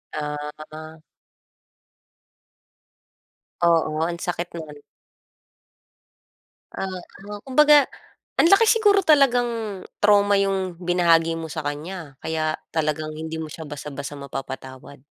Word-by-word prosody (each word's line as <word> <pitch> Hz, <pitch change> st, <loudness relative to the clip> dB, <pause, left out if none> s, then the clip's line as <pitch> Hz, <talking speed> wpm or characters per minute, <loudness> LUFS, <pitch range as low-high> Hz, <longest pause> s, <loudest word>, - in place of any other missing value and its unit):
Ah, 150 Hz, -1 st, -3 dB, 0.2 s
a -, -, -6 dB
ah. 155 Hz, 0 st, -10 dB, 2.6 s
Oo. 165 Hz, -2 st, +2 dB
Ang 170 Hz, -, -4 dB
sakit 175 Hz, 0 st, -3 dB
nun. 155 Hz, -2 st, -8 dB, 2.0 s
Oo. 190 Hz, -1 st, -4 dB, 0.5 s
Kumbaga, 295 Hz, +2 st, +6 dB, 0.6 s
ang -, -, +6 dB
laki 395 Hz, +3 st, +6 dB
siguro 415 Hz, -3 st, +4 dB
talagang 240 Hz, -, +2 dB, 0.2 s
trauma 205 Hz, -1 st, +5 dB
yung 190 Hz, -3 st, -1 dB
binahagi 170 Hz, -2 st, +3 dB
mo 165 Hz, 0 st, -5 dB
sa 155 Hz, -, -3 dB
kanya, 150 Hz, +1 st, -5 dB
kaya 155 Hz, -1 st, -1 dB, 0.2 s
talagang 155 Hz, -1 st, -1 dB
hindi 160 Hz, +1 st, -6 dB
mo 160 Hz, -1 st, -5 dB
siya 160 Hz, -1 st, -8 dB
basta-basta 145 Hz, 0 st, -7 dB
mapapatawad. 135 Hz, -1 st, -8 dB
165 Hz, 105 wpm, -23 LUFS, 155-200 Hz, 2.6 s, Kumbaga